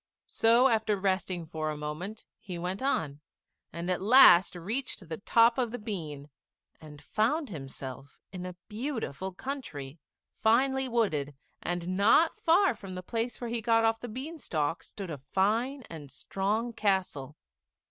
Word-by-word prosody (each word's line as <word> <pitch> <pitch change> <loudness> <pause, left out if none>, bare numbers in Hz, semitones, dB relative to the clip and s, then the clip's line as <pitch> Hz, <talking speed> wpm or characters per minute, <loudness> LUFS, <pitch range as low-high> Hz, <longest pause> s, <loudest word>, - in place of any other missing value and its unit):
So 235 +3 +4
after 220 -4 +1
resting 185 -3 -1
for 155 -1 -3
a 150 - -4
moment 155 +9 -6
he 180 -3 -7
went 180 +4 -3
on, 155 - -1 0.5
and 170 +1 -5
at 185 0 0
last 200 -5 +7
reached 205 +2 -4
the 160 - -4
top 230 +4 +4
of 245 -2 +1
the 245 - -5
bean, 155 -10 -6 0.5
and 150 -1 -12
found 260 - 0
himself 135 -2 -8
in 180 -2 -6
a 180 -1 -6
beautiful 215 - -4
country, 180 - -6 0.4
finely 265 +4 +3
wooded; 155 - 0 0.3
and 175 +1 -2
not 230 +11 +4
far 360 +4 +4
from 190 -2 -9
the 180 - -6
place 230 +4 -3
where 240 -2 -4
he 240 - 0
had 225 - -7
got 225 -1 +4
off 225 0 +2
the 245 - -6
bean 280 +9 -6
stalk 155 - -1
stood 195 -4 -7
a 145 - -5
fine 220 - 0
and 150 -4 -9
strong 210 - -2
castle. 185 -10 -1
195 Hz, 160 wpm, -29 LUFS, 160-235 Hz, 0.5 s, last